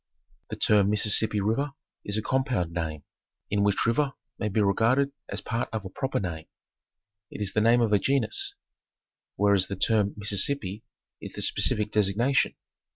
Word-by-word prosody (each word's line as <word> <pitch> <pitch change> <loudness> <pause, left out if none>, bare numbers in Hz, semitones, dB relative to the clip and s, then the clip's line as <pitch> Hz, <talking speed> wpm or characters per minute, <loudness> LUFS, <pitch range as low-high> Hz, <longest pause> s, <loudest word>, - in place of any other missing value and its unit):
The - - -4
term 100 -2 +3
Mississippi 105 0 +2
River 135 +8 0 0.3
is 100 +1 -2
a 110 - -2
compound 130 -10 0
name, 80 -4 -4 0.5
im 100 0 +1
which 100 -1 +2
river 135 +4 +1 0.3
may 105 - -1
be 105 - 0
regarded 115 +7 +2 0.2
as - - -2
a - - -24
part 115 0 -2
of 110 -3 -4
a 95 - -7
proper 135 +6 -2
name. 85 -5 -5 0.8
It - - -9
is 100 -2 -2
the 110 - +2
name 115 +2 +4
of 110 -2 +2
a 105 - +5
genus, 130 0 0 0.8
whereas 100 -2 +3
the 100 - -4
term 105 +1 +1
Mississippi 105 0 -1 0.4
is - - -8
the - - -6
speci - - +2
fic 105 0 -2
designation. 110 +6 +2
105 Hz, 170 wpm, -27 LUFS, 100-115 Hz, 0.8 s, a